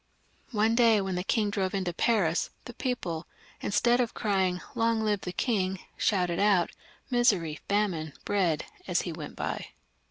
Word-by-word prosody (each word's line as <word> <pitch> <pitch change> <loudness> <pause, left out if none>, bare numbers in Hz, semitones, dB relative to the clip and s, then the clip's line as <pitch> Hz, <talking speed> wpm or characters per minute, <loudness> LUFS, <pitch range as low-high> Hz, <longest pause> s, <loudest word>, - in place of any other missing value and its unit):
One 220 0 +2
day, 230 -2 +5
when 190 -1 -2
the 180 0 -1
king 210 0 +1
drove 195 -1 -1
into 185 -3 -1
Paris, 180 -5 +2 0.2
the 245 - -8
people, 200 - -3 0.3
instead 240 +4 +3
of 235 - -2
crying, 190 -3 +1
" - - -21
Long 230 -1 +1
live 210 -2 +1
the 180 - -4
King! 190 -2 0
" - - -36
shouted 180 -4 +1
out 200 -4 +3 0.2
" - - -32
Misery, 190 -11 +2
famine, 185 -7 0
bread! 175 -7 +1
" - - -23
as 180 -2 +2
he 175 - -4
went 155 -3 -7
by. - - -3
195 Hz, 180 wpm, -29 LUFS, 180-220 Hz, 0.3 s, day